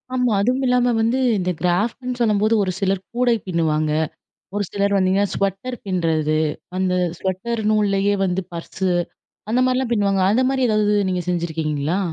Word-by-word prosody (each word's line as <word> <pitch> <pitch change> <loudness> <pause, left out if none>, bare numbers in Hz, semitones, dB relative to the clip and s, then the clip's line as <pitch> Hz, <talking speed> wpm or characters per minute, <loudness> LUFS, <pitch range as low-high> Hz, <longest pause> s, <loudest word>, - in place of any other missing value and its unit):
ஆமா. 250 -2 +2
அதுவும் 255 +5 +1
இல்லாம 250 -1 +3
வந்து 230 +4 +1 0.2
இந்த 180 0 0
கிராஃப்ட்ன்னு 230 +8 -1
சொல்லும்போது, 215 0 +2
ஒரு 185 - -1
சிலர் 195 -1 0
கூடை 245 -1 +3
பின்னுவாங்க. 155 -3 0 0.6
ஒரு 205 0 0
சிலர் 200 0 0
பாத்தீங்கன்னா 195 +1 +2
ஸ்வெட்டர் 195 +6 -2
பின்றது, 160 -4 0 0.4
அந்த 185 -1 +1 0.2
ஸ்வெட்டர் 205 +5 -2
நூல்லயே 205 -1 +2
வந்து 180 0 0
பர்சு, 185 +2 -3 0.6
அந்த 245 +3 +2
மாதிரிலாம் 255 -1 0
பின்னுவாங்க. 200 -3 +2
அந்த 255 +3 +2
மாதிரி 265 -1 +1
எதாவது 210 -1 +2
நீங்க 180 -1 -1
செஞ்சுருக்கீங்களா? 160 -1 -1
200 Hz, 145 wpm, -21 LUFS, 180-235 Hz, 0.6 s, இல்லாம